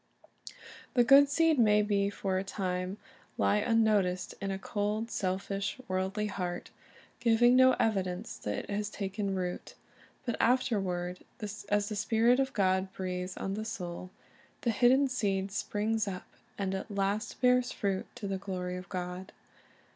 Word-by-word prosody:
The 245 - +6
good 275 +3 +7
seed 320 0 +3
may 210 -2 +3
for 195 -2 -1
a - - -2
time 185 -1 -3 0.4
lie 205 - +3
unnoticed 210 -5 +2
in 195 - -2
a 195 - -2
cold, 210 +3 -2
selfish, 195 +3 -2
worldly 190 +3 -1
heart, 180 -3 -4 0.5
giving 240 +1 +5
no 260 0 +7
evidence 190 -6 -1
that 105 - -3
it - - -14
has 205 +1 -1
taken 200 -1 -3
root; 180 -1 -4 0.5
but 240 - -1
afterward, 195 -8 +1 0.5
as 205 0 +1
the 210 - -3
Spirit 230 +4 +3
of 265 0 +1
God 190 -1 +1
breathes 180 0 -4
on 195 - -3
the 215 +2 -3
soul, 180 -4 -5 0.5
the 235 - +1
hidden 255 +5 +4
seed 200 -6 -1
springs 215 +2 -1
up, 185 -2 -5 0.3
and 195 -1 -1
af 190 - -4
last 200 +2 -1
bears 250 0 +3
fruit 195 -2 -2
to 200 - -5
the 195 -1 -2
glory 180 -2 -4
of 185 +1 -9
God. 180 0 -5
200 Hz, 145 wpm, -31 LUFS, 185-225 Hz, 0.5 s, good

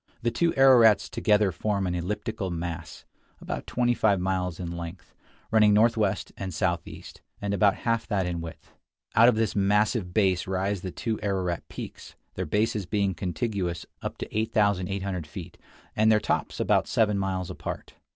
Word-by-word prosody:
The 120 - +1
two 170 +8 +2
Ararats 120 -7 +6
together 105 -2 +2
form 100 +2 -1
an 90 - -1
elliptical 95 +3 -3
mass, 85 -1 -5 0.3
about - - -5
twenty 120 -1 +1
five 105 -5 +2
miles 90 -2 -1
in 85 -2 -4
length, 85 +1 -8 0.4
running 105 -2 +5
northwest 110 -2 +2
and 95 -1 -4
southeast, 85 +1 -3 0.2
and 100 0 -2
about 100 0 +4
half 115 -1 +1
that 100 -5 0
in 85 -1 -3
width. 80 0 -10 0.4
Out 115 +2 +7
of 120 - +2
this 110 -1 0
massive 105 0 +2
base 95 -2 +2
rise 95 +1 -1
the 95 - -4
two 110 +4 -3
Ararat 95 -4 -2
peaks, - - -9 0.2
their - - -4
bases 105 +1 0
being 100 -1 0
contiguous 90 -2 -3 0.2
up - - -5
to - - -7
8800 100 -5 0
feet 75 - -9 0.4
and 110 +1 +4
their 105 - +5
tops - - -2
about - - +2
seven 105 -3 +2
miles 95 -2 -2
apart. - - -6
100 Hz, 160 wpm, -27 LUFS, 90-110 Hz, 0.4 s, Out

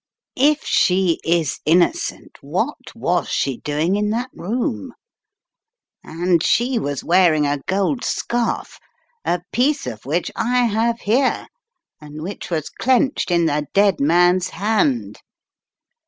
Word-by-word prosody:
If 295 +3 +3
she 180 -2 +2
is 165 -4 0
innocent, 180 - 0
what - - -4
was - - -1
she 135 -3 -1
doing 155 +8 -1
in 210 0 0
that 240 +4 -2
room? 230 +7 -3 1.1
And 170 +1 0
she 240 +1 +2
was 145 -5 -3
wearing 170 -4 +3
a 145 0 0
gold 200 +7 0
scarf, 240 -1 -2 0.4
a 175 0 -1
piece 280 +4 +1
of 110 -4 -7
which 160 +6 -2
I 245 +2 +1
have 230 +1 0
here 250 +6 +1 0.6
and 150 +1 -9
which 195 +4 -7
was 160 -4 -3
clenched 260 0 +1
in 170 -1 +2
the 150 -1 -1
dead 200 -3 +3
man's 175 +5 +3
hand!" 225 +6 0
185 Hz, 125 wpm, -20 LUFS, 160-235 Hz, 1.1 s, If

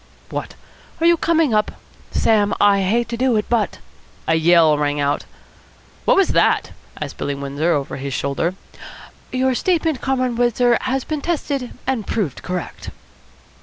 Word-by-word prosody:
What, - - -5 0.4
are 330 - +1
you 340 0 +6
coming 325 -5 +2
up? 210 0 +1 0.4
Sam, 210 -2 +2
I 200 -1 +4
hate 230 +5 +1
to 235 - -3
do 255 -1 +2
it, 210 - +1
but 230 -4 0 0.3
" - - -29
A - - +3
yell 160 -1 +5
rang 145 0 0
out. 145 0 0 0.8
"What - - +4
was 390 - +4
that?" - - +2 0.3
asked - - -6
Billy 140 - -2
Windsor 140 +4 -1
over 140 -3 -2
his 140 +1 -5
shoulder. 140 +6 -1 0.8
"Your 260 0 +1
statement, 320 -2 0
Comrade 255 -3 0
Windsor, 240 0 +3
has 260 0 -1
been 305 -2 -3
tested 280 -6 -3
and 250 -6 -1
proved 185 - -2
correct." 180 -2 -5
225 Hz, 160 wpm, -20 LUFS, 165-260 Hz, 0.8 s, you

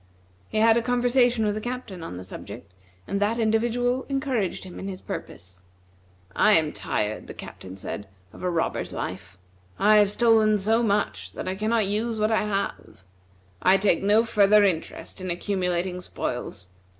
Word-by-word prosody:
He - - -3
had 225 +1 +5
a - - +2
conversation 245 -1 +2
with 210 - +1
the 215 - -4
Captain 240 -6 -5
on 160 - -7
the 90 - -7
subject, 90 -1 -10 0.3
and 200 - -2
that 215 +3 +1
individual 240 +3 +1
encouraged 265 - -1
him 185 -2 -9
in 195 - -5
his 190 -2 -6
purpose. 90 0 -8 0.7
"I 215 - +5
am 160 -5 +3
tired," 105 0 -3
the - - -9
Captain 95 +1 -10
said, 100 +1 -6 0.3
"of - - -12
a 180 - 0
robber's 170 -2 -1
life. 95 0 -6 0.4
I 215 +1 +5
have 205 -1 +5
stolen 220 -1 +4
so 220 +4 +2
much, 210 -2 -1
that - - -6
I 185 - -1
cannot 215 +2 +1
use 220 +3 -1
what 215 +1 +2
I 220 - +2
have. 200 - -4 0.6
I 190 +1 +5
take 195 -3 +2
no 210 +3 +4
further 210 -2 +5
interest 185 0 -2
in 185 - -4
accumulating 180 0 -1
spoils. 90 - -5
205 Hz, 170 wpm, -25 LUFS, 180-225 Hz, 0.7 s, had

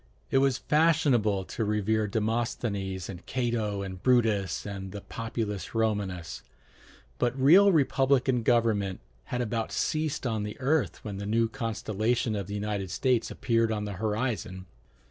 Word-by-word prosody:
It 135 - +4
was 135 -2 +2
fashionable 140 - +2
to 115 - -3
revere 105 +1 +1
Demosthenes 105 -3 -2
and 90 -2 -8
Cato 115 -5 -1
and 95 -1 -7
Brutus 110 -8 +2
and 95 -2 -6
the 105 0 -7
Populus 115 -3 -4
Romanus; 100 -6 -1 0.8
but 125 +2 0
real 185 +9 +7
republican 135 -5 +2
government 110 -5 +1 0.3
had 125 - -2
about 115 -1 -2
ceased 155 -3 -1
on 110 -3 -1
the 105 0 -5
earth 135 0 0
when 100 -2 -4
the 100 +1 -5
new 115 +2 +2
constellation 115 -1 -1
of 100 -3 -3
the 100 - -5
United 100 -2 -3
States 125 +1 +1
appeared 115 -2 +1
on 105 -1 -2
the 100 - -4
horizon. 105 -4 -2
110 Hz, 145 wpm, -28 LUFS, 100-125 Hz, 0.8 s, real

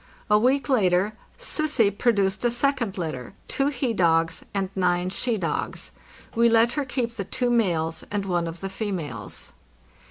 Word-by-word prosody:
A 210 - +6
week 255 +3 +2
later 200 -5 +3
" - - -31
Sussi'' 305 - +1
produced 205 -3 +1
a 240 - +4
second 240 -4 0
litter, 155 -8 -4
two 275 - +1
he 260 -4 0
dogs 165 -3 +2
and 195 -2 -2
nine 180 -1 +1
she 235 +3 0
dogs. 170 -4 -2 0.4
We 235 +1 +4
let 230 +1 +5
her 285 +3 -1
keep 240 -3 -2
the 200 - -1
two 245 +5 -1
males 170 -8 +1
and 205 -1 -1
one 175 -3 0
of 165 +1 -7
the 195 - -3
females. 175 - -5
205 Hz, 165 wpm, -25 LUFS, 180-240 Hz, 0.4 s, A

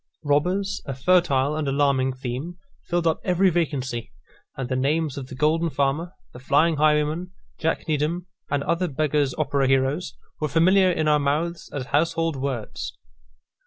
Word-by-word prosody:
Robbers, 180 +8 0
a 135 - -3
fertile 145 -2 +2
and 155 -2 -2
alarming 135 -2 +2
theme, 130 +7 -5 0.3
filled 175 0 0
up 160 - +2
every 185 +1 +3
vacancy; 135 -8 -2 0.5
and 135 -2 -3
the 130 - -1
names 145 +3 0
of 135 -2 -6
the 130 - -9
Golden 160 +4 +2
Farmer, 150 +5 -1 0.2
the 125 - -10
Flying 150 +5 +2
Highwayman, 155 +3 +2 0.3
Jack - - -1
Needham, 155 +4 -1 0.2
and 145 -1 0
other 170 +3 0
Beggars' 150 -2 0
Opera 140 -2 +1
heroes, 135 +5 +1 0.2
were 155 - 0
familiar 185 +5 +4
in 160 -3 0
our 150 -1 +4
mouths 155 +4 -1
as 135 -3 -4
household 165 +3 +1
words. 130 -5 -4
150 Hz, 155 wpm, -24 LUFS, 135-170 Hz, 0.5 s, familiar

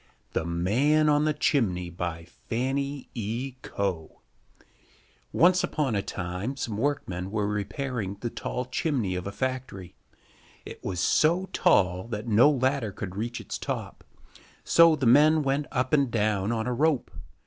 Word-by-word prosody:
The - - -1
Man 125 - +2
on 150 0 +3
the 155 - +2
Chimney 90 - 0
FANNY 120 +12 -3
E. 120 +4 -4
COE 90 -5 -3 1.2
Once 180 +1 +4
upon 145 -7 -1
a 100 - +1
time 95 +9 -4
some 115 -5 -3
workmen 105 -8 -2
were 105 0 -1
repairing 105 +1 -3
the 120 - -3
tall 125 - -4
chimney 125 - -1
of 90 +1 -4
a - - -4
factory. 125 -7 -4 0.7
It - - -10
was 90 -3 -3
so 170 - +2
tall 90 +1 +2
that 110 -2 -5
no 115 +6 +6
ladder 130 -5 0
could 95 -1 -7
reach 115 +3 -3
its - - -6
top, - - -5 0.6
so 165 -1 +6
the 140 -3 -2
men 150 +5 +5
went 140 +2 0
up 130 0 -1
and 140 -3 +3
down 105 -2 0
on 110 -1 -1
a 125 - -1
rope. 150 0 +1
120 Hz, 150 wpm, -27 LUFS, 100-140 Hz, 1.2 s, no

